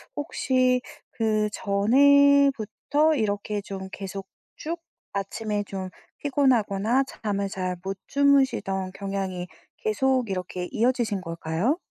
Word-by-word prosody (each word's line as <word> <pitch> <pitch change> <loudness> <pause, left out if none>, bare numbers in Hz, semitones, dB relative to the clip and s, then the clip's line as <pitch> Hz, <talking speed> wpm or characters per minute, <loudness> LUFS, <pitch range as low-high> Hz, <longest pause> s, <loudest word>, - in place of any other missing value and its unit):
혹시 255 -4 +1 0.3
그 215 -2 +1
전에부터 280 +6 +4
이렇게 205 -2 -1
좀 190 -1 -7
계속 195 0 -6 0.3
쭉 335 +2 -4 0.8
아침에 205 0 +1
좀 190 -2 -5 0.3
피곤하거나 250 -4 +2
잠을 200 -6 -3
잘 185 -1 -3
못 195 0 -4
주무시던 265 -10 +2
경향이 195 -2 -4 0.3
계속 255 +1 +1
이렇게 180 -1 -4
이어지신 230 -4 +1
걸까요? 165 - -1
215 Hz, 230 characters per minute, -25 LUFS, 195-265 Hz, 0.8 s, 전에부터